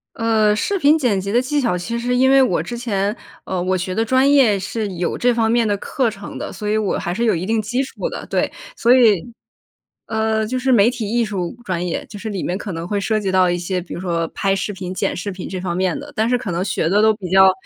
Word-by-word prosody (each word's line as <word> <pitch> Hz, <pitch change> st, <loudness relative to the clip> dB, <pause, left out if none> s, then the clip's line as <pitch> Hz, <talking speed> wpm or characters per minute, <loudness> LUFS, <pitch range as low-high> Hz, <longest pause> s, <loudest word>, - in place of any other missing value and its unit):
呃， 220 Hz, -2 st, +2 dB
视 395 Hz, -, -1 dB
频 300 Hz, -2 st, +5 dB
剪 240 Hz, -10 st, +1 dB
辑 200 Hz, +1 st, -4 dB
的 245 Hz, +2 st, +3 dB
技 290 Hz, +3 st, 0 dB
巧， 235 Hz, -8 st, 0 dB
其 230 Hz, +7 st, -3 dB
实 245 Hz, +1 st, -1 dB
因 260 Hz, +2 st, +4 dB
为 270 Hz, -, +6 dB
我 260 Hz, -, +2 dB
之 240 Hz, -, -6 dB
前， 205 Hz, -3 st, -1 dB, 0.3 s
呃， 185 Hz, -1 st, -2 dB
我 185 Hz, +1 st, 0 dB
学 185 Hz, +1 st, -3 dB
的 225 Hz, +4 st, 0 dB
专 260 Hz, +4 st, +3 dB
业 250 Hz, -8 st, +5 dB
是 210 Hz, +3 st, -3 dB
有 175 Hz, 0 st, -2 dB
这 245 Hz, 0 st, +2 dB
方 225 Hz, -1 st, +1 dB
面 235 Hz, 0 st, +2 dB
的 205 Hz, -1 st, +1 dB
课 255 Hz, +4 st, -1 dB
程 205 Hz, -2 st, -7 dB
的， -, -, -5 dB
所 210 Hz, -, -5 dB
以 215 Hz, -, +1 dB
我 215 Hz, -3 st, 0 dB
还 175 Hz, -, -3 dB
是 235 Hz, +6 st, -1 dB
有 225 Hz, -, +3 dB
一 170 Hz, +1 st, -3 dB
定 220 Hz, +2 st, +1 dB
基 240 Hz, +5 st, -1 dB
础 270 Hz, -, -4 dB
的， -, -, -7 dB
对。 -, -, -1 dB, 0.2 s
所 240 Hz, +2 st, +4 dB
以 230 Hz, -3 st, +3 dB, 0.7 s
呃， 220 Hz, -1 st, 0 dB
就 255 Hz, +4 st, -3 dB
是 260 Hz, +1 st, 0 dB
媒 225 Hz, -3 st, +5 dB
体 240 Hz, -4 st, -3 dB
艺 235 Hz, 0 st, +2 dB
术 190 Hz, -5 st, -3 dB
专 180 Hz, -4 st, -2 dB
业， 175 Hz, -, -3 dB
就 -, -, -10 dB
是 220 Hz, +2 st, -6 dB
里 200 Hz, -4 st, -3 dB
面 180 Hz, -, -1 dB
可 205 Hz, -, -6 dB
能 165 Hz, -1 st, -5 dB
会 205 Hz, +1 st, -1 dB
涉 215 Hz, +2 st, 0 dB
及 195 Hz, -3 st, -2 dB
到 185 Hz, -1 st, +4 dB
一 175 Hz, -, 0 dB
些， 180 Hz, +1 st, -2 dB
比 175 Hz, -, -10 dB
如 -, -, -5 dB
说 170 Hz, -2 st, -1 dB
拍 195 Hz, -1 st, 0 dB
视 195 Hz, +2 st, -2 dB
频、 185 Hz, -1 st, -6 dB
剪 -, -, -1 dB
视 200 Hz, +3 st, -4 dB
频 185 Hz, -1 st, -7 dB
这 185 Hz, -1 st, -5 dB
方 175 Hz, -2 st, -3 dB
面 185 Hz, -1 st, 0 dB
的， -, -, -10 dB
但 220 Hz, +2 st, +1 dB
是 250 Hz, -, +2 dB
可 210 Hz, -7 st, -4 dB
能 175 Hz, +2 st, -1 dB
学 175 Hz, -4 st, 0 dB
的 205 Hz, +4 st, +3 dB
都 220 Hz, 0 st, +5 dB
比 195 Hz, -4 st, -7 dB
较 190 Hz, 0 st, +7 dB
210 Hz, 295 characters per minute, -20 LUFS, 185-235 Hz, 0.7 s, 较